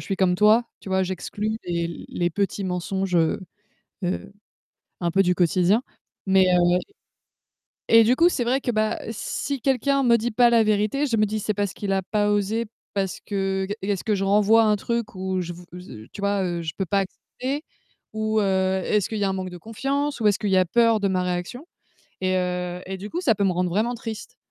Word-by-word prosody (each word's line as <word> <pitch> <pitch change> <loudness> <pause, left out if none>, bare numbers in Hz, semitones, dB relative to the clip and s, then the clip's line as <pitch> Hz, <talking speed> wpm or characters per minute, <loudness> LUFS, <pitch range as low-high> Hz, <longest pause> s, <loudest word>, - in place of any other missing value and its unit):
suis 195 - -2
comme 185 -2 +2
toi, 210 +5 +5 0.2
tu - - -10
vois, 190 0 +2
j'exclus 205 +4 -3
les 170 -1 -3
les 175 0 -1
petits 200 +2 -2
mensonges, 185 +1 -2
heu 165 -1 +2 0.6
heu, 190 +2 -3 0.7
un 170 -1 -1
peu 195 +3 +4
du 180 -1 +2
quotidien. 180 +5 +3 0.5
Mais, 190 0 +5
heu - - +5
et - - +4 1.2
et 225 0 +8
du 240 +3 +4
coup, 335 +6 +5
c'est 250 -9 -1
vrai 255 +3 +1
que, 250 - -2
bah, 215 -1 0
si 260 +4 -3
quelqu'un 275 +2 +1
me 235 -1 +5
dit 235 +1 -2
pas 240 +2 +4
la 235 -1 +5
vérité, 215 +7 +1
je 240 -5 0
me 215 -1 +3
dis: 215 +1 -3
«C'est 215 - -1
parce 200 -2 -2
qu'il 200 -2 -3
a 190 0 +1
pas 205 +2 0
osé, 205 +3 0 0.3
parce 195 -2 -1
que 195 -1 -2
g 205 - -2
est-ce 195 -1 -2
que 215 - +1
je 195 - -2
renvoie 210 +3 +5
un 215 -1 +3
truc 235 +1 -3
où 185 0 -2
je 175 0 -4
v» 175 +1 -12 0.2
z 180 - -13
heu, 110 +1 -10
tu - - -8
vois, 200 0 +1
heu, 175 -1 -2
je 160 -1 -4
peux 195 - -2
pas 200 +3 +1
accepter? 260 - -5 0.5
Ou, 220 0 0
heu, 190 -1 +1
est-ce 210 -3 +1
qu'il 220 - -4
y 205 - 0
a - - +2
un - - 0
manque 185 -1 -4
de 180 - -9
confiance? 275 - -2
Ou 215 - +4
est-ce 205 0 +2
qu'il 205 - -2
y 190 - +3
a 185 - +5
peur 230 +4 +3
de 200 - +1
ma 185 -1 0
réaction? 180 - -4 0.5
Et, 185 0 +1
heu, 180 -1 -2
et 190 0 -5
du 200 +3 -7
coup, 350 +10 -4
ça 235 -10 +3
peut 200 - 0
me 190 - +2
rendre 180 0 0
vraiment 220 +7 0
triste. 225 -2 -7
200 Hz, 230 wpm, -24 LUFS, 185-225 Hz, 1.2 s, et